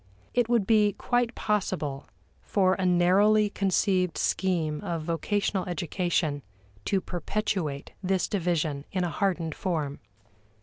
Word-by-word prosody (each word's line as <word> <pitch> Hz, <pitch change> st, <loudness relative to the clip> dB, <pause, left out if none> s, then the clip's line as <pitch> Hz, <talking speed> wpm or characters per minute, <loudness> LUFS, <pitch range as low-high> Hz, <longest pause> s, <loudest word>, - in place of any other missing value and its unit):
It 240 Hz, -2 st, +2 dB
would 235 Hz, -5 st, +3 dB
be 210 Hz, -1 st, +4 dB
quite 245 Hz, -1 st, 0 dB
possible 180 Hz, -10 st, -2 dB, 0.3 s
for 185 Hz, -2 st, +2 dB
a 190 Hz, -1 st, 0 dB
narrowly 200 Hz, +4 st, +4 dB
conceived 185 Hz, -3 st, +1 dB
scheme 165 Hz, -6 st, 0 dB
of 165 Hz, -2 st, -3 dB
vocational 190 Hz, +4 st, -1 dB
education 175 Hz, -4 st, -1 dB, 0.4 s
to 195 Hz, -2 st, +1 dB
perpetuate 175 Hz, -5 st, -3 dB
this 190 Hz, -1 st, 0 dB
division 165 Hz, -7 st, -1 dB
in 185 Hz, -1 st, 0 dB
a 175 Hz, -, -1 dB
hardened 170 Hz, -2 st, -1 dB
form. 155 Hz, -7 st, -2 dB
185 Hz, 120 wpm, -27 LUFS, 165-205 Hz, 0.4 s, be